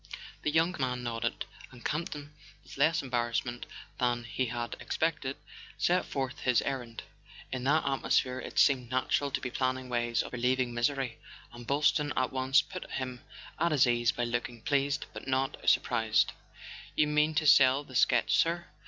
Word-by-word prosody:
The - - 0
young 165 +4 +2
man 125 -2 -1
nodded, 115 0 -2 0.2
and 125 -2 -15
Campton, 150 -2 -4 0.3
with - - -12
less 155 +3 +2
embarrassment 120 -1 -2 0.3
than 120 -1 +1
he 120 +2 -2
had 120 0 -4
expected, 150 -4 -2 0.4
set 180 +1 +2
forth 135 -2 -3
his 125 -2 +2
errand. 125 -4 -4 0.5
In 130 -1 -3
that 155 +3 +3
atmosphere 130 -1 +1
it - - -8
seemed 130 -4 +4
natural 130 +2 0
to - - -2
be 125 - -5
planning 130 0 -1
ways 120 -1 0
of - - -10
relieving 125 0 0
misery, 125 0 -1 0.3
and 120 -1 -11
Boylston 145 +1 +2
at 130 0 0
once 130 +2 +3
put 185 -1 -8
him 130 -2 -4 0.4
at 170 +1 +2
his 145 -3 +5
ease 120 -2 +2
by 120 - -3
looking 120 -1 -3
pleased 140 0 0
but - - -9
not 135 0 0
surprised. 110 -1 +2 0.6
"You 150 - +4
mean 150 +1 +2
to 155 - +1
sell 135 -1 +6
the 135 - -14
sketch, 120 0 +3
sir? 170 +1 +1
130 Hz, 165 wpm, -30 LUFS, 120-145 Hz, 0.6 s, sell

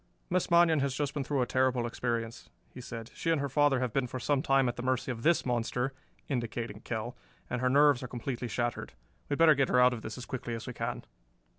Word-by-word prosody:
"Miss 185 0 +1
Manion 170 -2 +5
has 135 -1 0
just 145 0 -2
been 145 -3 -2
through 135 -1 0
a - - 0
terrible 130 -1 +1
experience," 115 -1 -3 0.2
he 125 - -8
said. 115 -1 -8
"She - - -3
and 165 -2 +3
her 140 - -1
father 145 -1 +3
have 125 -3 -2
been 135 -2 +1
for 130 - -5
some 140 +2 +1
time 135 -2 +3
at 120 - -1
the 120 - -5
mercy 130 +1 0
of 115 -2 -6
this 170 +6 +3
monster" 125 +2 -1 0.3
indicating 120 -4 -3
Kell 115 +2 -4 0.4
"and 125 - -1
her 130 - +2
nerves 145 -1 +5
are 125 - -5
completely 120 0 -4
shattered. 120 +1 -3 0.4
We'd 145 - 0
better 165 -1 +7
get 135 -1 +1
her 125 - +4
out 125 0 +6
of 115 - -6
this - - -6
as 125 - -7
quickly 120 -2 -4
as 115 0 -7
we 125 - -6
can." - - -4
125 Hz, 240 wpm, -30 LUFS, 120-140 Hz, 0.4 s, better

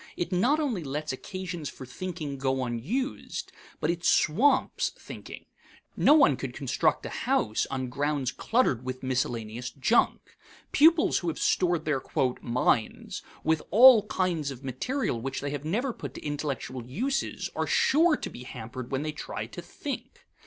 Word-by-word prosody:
It 175 +1 -2
not 245 +12 +3
only 245 - -1
lets 150 +1 -3
occasions 175 0 -5
for 130 - -10
thinking 150 0 -5
go 130 -1 0
unused, 145 - -3 0.3
but 155 - +1
it 170 0 -5
swamps 260 - +3
thinking. - - -10 0.5
No 295 - +6
one 145 - +5
could 130 -2 -5
construct 135 - 0
a - - -4 0.2
house 110 0 +1
on 130 -1 -2
ground 140 0 -1
cluttered 220 - +1
with 130 0 -5
miscellaneous 120 -2 -2
junk. 140 - +1 0.3
Pupils 325 +2 +5
who 175 - -5
have 165 - -1
stored 175 -3 +1
their 150 -4 0 0.4
"minds" 120 -2 0 0.2
with 160 -1 +2
all 225 0 +8
kinds 170 -8 0
of 135 -1 -8
material 135 - -2
which 135 +2 -3
they 140 0 -3
have 145 0 -5
never 235 - 0
put 140 - -8
to - - -9
intellectual 140 -4 -3
uses 250 - -2
are - - -1
sure 350 - +4
to - - -5
be - - -10
hampered 125 +1 -7
when 135 +1 -1
they 155 - -2
try 150 - -5
to - - -8
think. - - -7
150 Hz, 160 wpm, -28 LUFS, 130-205 Hz, 0.5 s, all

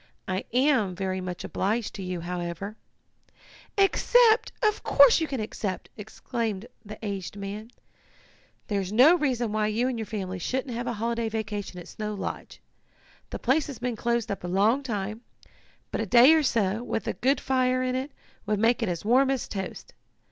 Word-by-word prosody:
I 185 +1 -2
am 250 -7 +2
very 190 0 -2
much 180 -1 -5
obliged 215 +3 -1
to 200 - -7
you, 180 -2 -4
however 175 +3 -4 0.5
" - - -25
"Accept! 480 -2 +4
Of 425 0 +2
course 280 +2 +6
you 320 - 0
can 270 -3 -3
accept!" 210 -3 -4
exclaimed 220 -1 -4 0.2
the 210 0 -9
aged 200 -1 -4
man. 205 +3 -6 1.0
"There's 200 -4 -2
no 255 +10 +7
reason 250 -8 0
why 215 0 +1
you 225 +4 0
and 250 -3 -2
your 220 - -4
family 190 -4 -4
shouldn't 255 - -2
have 240 +1 -4
a 240 - -1
holiday 230 +1 -1
vacation 205 -4 -4
at 175 - -10
Snow 210 -1 -5
Lodge. 195 - -6 0.7
The - - -5
place 275 +5 +1
has 280 -5 -7
been 245 -1 -2
closed 235 -1 -1
up 200 - -4
a - - -3
long 205 +9 +2
time, 215 -3 -4 0.7
but - - -1
a 225 - -3
day 245 - +8
or 320 - +4
so, 220 -6 +1
with 240 - -3
a - - 0
good 265 +2 +1
fire 255 -1 +1
in 255 0 -1
it, 260 +3 -3 0.4
would 210 0 +1
make 230 +4 +2
it 225 - 0
as 175 +2 -4
warm 260 +4 +4
as 270 -3 -1
toast. 195 -2 -6
220 Hz, 185 wpm, -27 LUFS, 200-255 Hz, 1.0 s, day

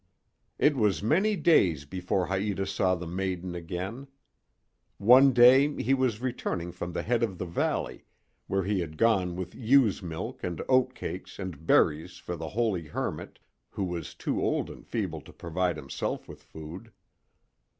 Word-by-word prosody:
It 145 0 +3
was 105 -6 +1
many 190 - +2
days 90 - +3
before 90 +4 -2
Haïta 95 0 -1
saw 95 -1 +1
the 85 0 -6
maiden 90 0 -3
again. 90 +10 -5 0.9
One 130 +6 +7
day 130 +4 +6
he 135 - +2
was 130 -5 +1
returning 105 -8 -3
from 85 0 -6
the - - -2
head 120 0 +1
of 105 -6 -1
the 90 - -4
valley, 85 0 -2 0.4
where 95 0 0
he 100 +1 0
had 80 -3 -5
gone 95 -6 +2
with 90 0 -5
ewe's 125 -3 +3
milk 85 -3 -6
and 85 -2 -3
oat 130 -1 +3
cake - - -5
and 85 -5 -7
berries 75 +2 +3
for - - -6
the - - -6
holy 105 -8 -1
hermit, - - -4 0.3
who 100 - -4
was 90 -2 -4
too - - -2
old - - 0
and - - -13
feeble - - -3
to - - -14
provide 90 0 -2
himself 70 -3 -4
with - - -11
food. 85 +8 -10
95 Hz, 160 wpm, -28 LUFS, 85-120 Hz, 0.9 s, One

